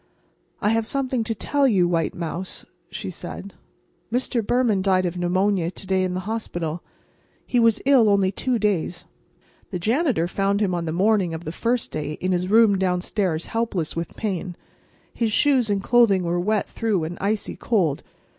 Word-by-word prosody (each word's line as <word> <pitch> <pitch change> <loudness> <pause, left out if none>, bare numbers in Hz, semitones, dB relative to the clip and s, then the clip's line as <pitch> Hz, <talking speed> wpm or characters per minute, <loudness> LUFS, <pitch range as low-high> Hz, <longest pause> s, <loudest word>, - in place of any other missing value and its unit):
"I 210 - +2
have 225 0 +1
something 260 -2 0
to 225 - -2
tell 280 +5 +1
you, 190 -7 +3
white 170 -2 0
mouse," 170 +2 -5 0.2
she - - -6
said. - - -8 0.6
"Mr. 245 -1 0
Behrman 230 -3 +2
died 185 -1 +2
of 175 0 -2
pneumonia 180 0 +1
to 185 - -9
day 190 0 +1
in 180 -1 -2
the 185 - -2
hospital. 175 -6 -4 0.6
He 245 - +1
was 230 -2 +3
ill 260 -6 +5
only 200 -2 +3
two 250 +5 -1
days. 185 -5 -1 0.6
The 185 - -3
janitor 225 - +1
found 195 +2 0
him 200 -4 +1
on 170 -1 -2
the 160 - -2
morning 190 -1 +2
of 160 - -7
the 155 - -3
first 235 +7 -1
day 150 -1 -3
in 185 +4 -2
his 180 0 0
room 215 -2 +5
downstairs 180 -2 -1
helpless 225 -8 -2
with 165 -1 -4
pain. 185 -4 -3 0.6
His 230 -2 0
shoes 260 -1 +3
and 200 -1 0
clothing 225 -6 +4
were 175 +1 0
wet 210 +3 0
through 215 -7 -1
and 165 +2 -4
icy 205 +2 -1
cold. 175 - 0
195 Hz, 175 wpm, -23 LUFS, 175-225 Hz, 0.6 s, ill